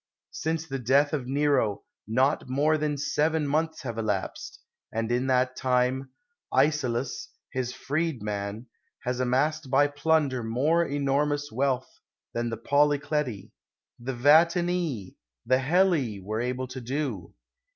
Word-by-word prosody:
Since 160 0 -2
the 135 -2 -3
death 140 +5 +3
of 135 -5 -2
Nero 135 -7 +1 0.2
not 130 +5 +1
more 145 +4 +2
than 150 -1 -1
seven 150 +2 +1
months 160 +2 -1
have 115 -3 -4
elapsed; 105 -4 -3 0.3
and 115 +1 -2
in 125 +2 +1
that 130 0 +2
time, 130 +1 +1 0.4
Icelus, 130 -3 0 0.2
his 130 -2 -2
freedman, 115 -8 -3 0.4
has 125 0 -2
amassed 135 +4 +1
by 140 +2 +5
plunder 145 -3 +1
more 140 +10 +2
enor 140 -1 +1
mous 145 0 -2
wealth 130 +1 -1 0.3
than 120 0 -1
the 115 - -4
Polycleti, 145 -3 +1 0.5
the 130 +3 -4
Vatinii, 160 - +3 0.3
the 130 +2 +3
Helii, 150 - +2
were 105 +4 -3
able 125 +1 -2
to 130 0 -6
do. 140 +4 -4
135 Hz, 130 wpm, -27 LUFS, 125-150 Hz, 0.5 s, by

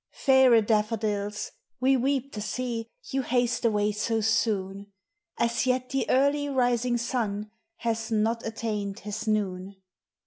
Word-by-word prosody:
Faire 260 -4 +5
da 210 0 +3
tfa 215 +1 -4
dills, 210 -1 -2 0.3
we 265 +2 +4
weep 270 +1 0
to 210 - -4
see 230 +2 -3 0.2
You 270 -1 +1
haste 245 -1 0
away 210 -2 +2
so 220 +2 -1
soone; 200 -3 0 0.5
As 235 +2 +1
yet 255 0 0
the 270 0 -1
early 285 +2 +2
rising 245 -2 +1
sun 215 -4 -2 0.2
Has 230 -5 -2
not 225 +2 +1
attained 210 -3 -3
his 215 +1 -5
noone. 195 -2 -1
225 Hz, 140 wpm, -27 LUFS, 210-250 Hz, 0.5 s, Faire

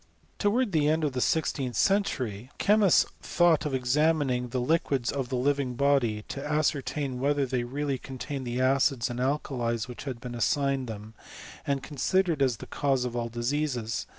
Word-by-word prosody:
* - - -36
Towards 220 +2 +2
the 155 -4 +2
end 160 +1 +1
of 145 -3 0
the 125 - -1
sixteenth 135 -5 0
century, 130 - 0
the - - -4
cho* 205 - +6
mists 200 -5 +5 0.2
thought 165 -4 +3
of 135 - -2
examining 130 -1 +1
the 125 +2 -4
liquids 135 -2 +1
of 135 -3 -3
the 130 - -2
liyfaig 130 -1 0
body, 125 -6 +2
to 140 - -5
ascertain 145 -3 -1
whether 140 +1 +1
they 125 -1 -1
really 135 +2 -2
contained 135 0 -6
thS' 120 +1 -2
acids 130 -1 +2
and 120 - -5
alkalies 125 -4 -1
which 125 +2 -9
had 130 -4 -5
been 125 0 -7
assigned 135 +2 0
them, 110 0 -8 0.5
and' 140 -1 0
considered 165 +2 0
as 130 -4 +2
the - - -9
cause 135 -3 0
of 120 -1 -4
all 120 -1 -2
diseases. 120 -1 -2
135 Hz, 180 wpm, -28 LUFS, 125-150 Hz, 0.5 s, cho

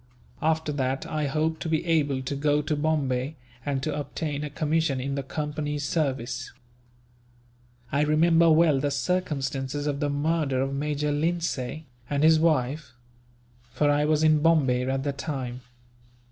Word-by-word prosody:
After 160 -1 +1
that, 135 -2 -1
I 155 -2 -2
hope 155 +3 0
to 165 - -4
be 160 +1 0
able 145 -5 +1
to 135 +2 -3
go 145 +1 +1
to 150 +1 -1
Bombay, 145 -2 0 0.3
and 135 -2 -2
to 155 - -1
obtain 145 0 -3
a 150 - -4
commission 150 -1 0
in 135 +2 -3
the 140 - -1
Company's 150 0 -3
service." 135 -5 -2 1.4
"I 140 - +2
remember 165 +2 +4
well 155 -3 +4
the 145 +1 0
circumstances 140 -2 -2
of 145 -1 -1
the 145 -1 0
murder 145 -2 0
of 135 +1 -1
Major 150 +1 -1
Lindsay, 155 -2 -2 0.2
and 145 0 0
his 160 0 +6
wife; 150 -3 0 0.8
for 145 -1 +2
I 145 +1 +2
was 155 0 +2
in 155 -1 +4
Bombay 135 -6 +3
at 135 0 -1
the 140 0 -1
time. 135 -4 -5
145 Hz, 155 wpm, -26 LUFS, 135-155 Hz, 1.4 s, his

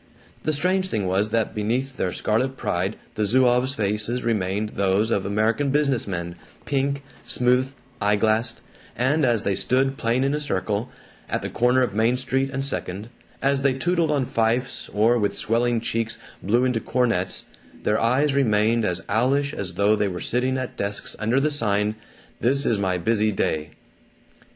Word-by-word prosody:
The 155 - 0
strange 185 +5 +1
thing 105 - -1
was 95 +3 +1
that 115 0 0
beneath 125 +6 -1
their 90 - -1
scarlet 130 +8 0
pride 95 +4 -1 0.2
the 110 - -1
Zouaves' 125 +4 +3
faces 105 +3 -1
remained 105 -2 0
those 100 +3 +1
of 100 -3 0
American 110 +7 +1
business 140 -5 +1
men, 85 -3 -4 0.3
pink, 140 0 -1 0.2
smooth, 125 +2 +2 0.3
eye 105 0 +3
glassed; 110 +2 +1 0.3
and 145 +6 +1
as 120 -4 +2
they 100 - +1
stood 135 +6 +1
playing 120 +2 +1
in 140 +1 +1
a 150 - 0
circle, 110 -6 -2 0.4
at - - -2
the - - -4
corner 125 +2 +3
of 120 - -1
Main 115 +4 +2
Street 130 +1 0
and 135 +1 -2
Second, 105 -5 -4 0.3
as 135 0 +2
they 135 -1 +2
tootled 170 +3 +1
on 145 -4 +1
fifes 115 +2 -1
or 115 +3 +3
with 100 -2 0
swelling 120 +1 +1
cheeks 115 0 -2 0.2
blew 120 +7 +2
into 125 -3 +1
cornets, 115 -7 0 0.4
their 105 - +2
eyes 135 +5 +2
remained 115 -3 +2
as 90 -2 -1
owlish 135 +7 +1
as 90 -3 -4
though 100 +3 +3
they 105 - +1
were 90 -2 -4
sitting 130 +2 0
at 130 -1 -5
desks 100 0 -3
under 115 +5 +2
the 150 +2 +1
sign 105 -6 +1 0.5
"This 140 +4 +2
Is 110 -4 +2
My 95 -2 0
Busy 110 +4 +1
Day." 80 -6 -1
115 Hz, 170 wpm, -24 LUFS, 105-130 Hz, 0.5 s, Zouaves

